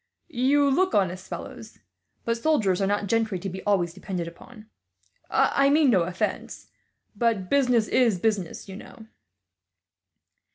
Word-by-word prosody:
"You 280 +2 +2
look 370 +8 +1
honest 185 -2 0
fellows, - - -9 0.5
but 230 - 0
soldiers 230 - +1
are 195 - +1
not 205 +1 0
gentry 220 -1 0
to 195 - -6
be 190 +1 -7
always 180 -5 +1
depended 175 -2 -5
upon. 215 +6 -13 0.6
I 275 0 +3
mean 290 -2 +4
no 190 -5 +3
offence, 180 +1 -4 0.4
but 205 -4 -1
business 250 -6 +3
is 235 -7 +2
business, 200 -3 -2
you 190 0 -8
know." 220 +1 -13
215 Hz, 135 wpm, -25 LUFS, 190-250 Hz, 0.6 s, mean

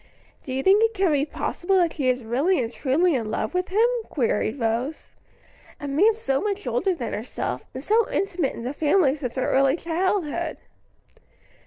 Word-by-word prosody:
"Do 265 - -7
you 265 +1 -2
think 395 +5 +5
it 450 -1 +1
can 380 -4 +2
be 290 0 +1
possible 380 +4 -1
that 345 -3 +2
she 265 -4 0
is 255 -1 0
really 275 +12 +1
and 235 -1 -2
truly 315 +6 +2
in 230 -5 -1
love 215 0 -2
with 365 +1 0
him?" 425 +5 +3 0.2
queried 235 -1 0
Rose; 235 +6 -2 0.7
"a 290 - -5
man 385 +11 +3
so 275 -12 -1
much 410 -1 -2
older 395 -7 0
than 240 -8 -5
herself, 205 - -4
and 260 - -7
so 445 +6 +2
intimate 360 -7 -1
in 230 - -7
the 255 +3 -3
family 295 -1 +3
since 275 -5 -5
her 260 - -1
early 270 +1 +3
childhood." 340 -2 -1
295 Hz, 185 wpm, -24 LUFS, 255-375 Hz, 0.7 s, think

